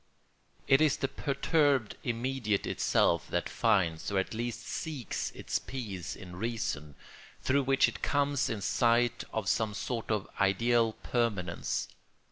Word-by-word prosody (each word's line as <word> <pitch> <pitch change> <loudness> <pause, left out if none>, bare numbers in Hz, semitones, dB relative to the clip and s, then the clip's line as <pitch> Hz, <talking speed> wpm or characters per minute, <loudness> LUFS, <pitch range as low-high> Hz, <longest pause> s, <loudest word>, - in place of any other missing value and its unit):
It 135 +2 +5
is 155 -3 +4
the 135 - 0
perturbed 140 -3 +1
immediate 120 -3 -1
itself 85 - +2
that - - -1
finds 85 -3 +1
or 100 - 0
at 95 - 0
least 115 0 -3
seeks 150 - -3
its - - -2
peace 100 -9 -5
in 90 -2 -10
reason, 90 -10 -3 0.4
through 140 +2 +2
which 135 0 +4
it - - -6
comes 145 -1 +1
in 110 -3 -3
sight 120 +3 +2
of 110 -3 -2
some 110 0 +1
sort 115 +2 -3
of 105 -3 0
ideal 115 +4 +3
permanence. 105 -8 -1
115 Hz, 135 wpm, -31 LUFS, 100-135 Hz, 0.4 s, It